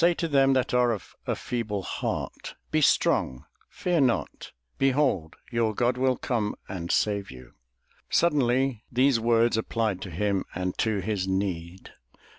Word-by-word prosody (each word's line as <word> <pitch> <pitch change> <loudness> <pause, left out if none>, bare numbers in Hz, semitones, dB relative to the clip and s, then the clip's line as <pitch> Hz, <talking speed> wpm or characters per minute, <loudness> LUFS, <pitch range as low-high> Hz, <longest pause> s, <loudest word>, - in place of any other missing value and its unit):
"Say 170 +1 +4
to 165 - -2
them 135 -3 +4
that 130 -2 0
are 125 -1 +4
of 90 -7 -8
a - - 0
feeble 110 -5 -3
heart. - - -4 0.2
Be 155 0 +2
strong, 65 - +2 0.2
fear 175 -4 0
not; 125 -3 -1 0.3
behold, 135 - +1 0.2
your 115 -2 0
God 120 +2 +2
will 130 -1 +1
come... 110 -5 -1
and 90 -3 -5
save 100 -2 +1
you." 65 -1 -12 0.6
Suddenly 135 -6 +2
those 130 0 +3
words 115 0 +3
applied 110 -3 -1
to 100 - -6
him 100 +3 0
and 90 0 -2
to 110 -3 +1
his 95 -1 -2
need. 95 -2 -3
115 Hz, 150 wpm, -27 LUFS, 95-130 Hz, 0.6 s, Say